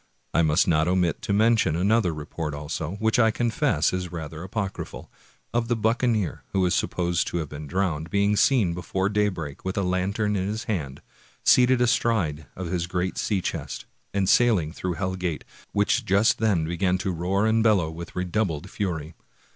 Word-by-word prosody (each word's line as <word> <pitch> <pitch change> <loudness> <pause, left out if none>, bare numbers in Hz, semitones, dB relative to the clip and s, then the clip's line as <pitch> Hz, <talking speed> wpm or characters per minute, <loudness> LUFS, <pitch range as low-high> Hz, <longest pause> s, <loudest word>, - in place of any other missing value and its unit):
I - - +4
must 80 +1 +3
not 80 -1 +3
omit 90 -3 +1
to - - -3
mention 110 -5 +3
another 100 +1 +2
report, 75 0 -5
also, 75 +3 -4
which 110 +2 +1
I 110 -2 +5
confess 115 -3 +1
is 90 -2 -3
rather 80 -2 -6
apocryphal, 95 +1 -5 0.4
of 120 -1 0
the 120 - +1
buccaneer 110 -3 0
who 95 -1 +2
is 90 - +1
sup - - +1
posed 85 -1 0
to - - -2
have 80 -4 -3
been 75 0 -7
drowned, 85 -3 -1
being 100 +3 +2
seen 105 -6 +3
before 95 +3 -1
daybreak, 100 -9 -2
with 95 +1 -3
a 100 - +1
lantern 100 +4 0
in 95 -1 -1
his 110 +2 -3
hand, 75 - -4 0.4
seated 125 0 +5
astride 105 - +1
of 95 - -5
his 85 -2 -1
great 90 +1 -2
sea 100 -3 0
chest, - - -4 0.3
and 100 -1 0
sailing 100 -10 +3
through 90 0 -3
Hell 95 +1 -2
Gate, 90 -4 -3 0.3
which 105 +4 +1
just 100 +1 +3
then 100 -8 +2
began 90 +3 0
to 95 0 -2
roar 90 +4 0
and 110 +1 +3
bellow 100 -8 +3
with 85 +1 -9
redoubled 90 -2 -2
fury. 85 -6 -3
95 Hz, 180 wpm, -25 LUFS, 85-105 Hz, 0.4 s, I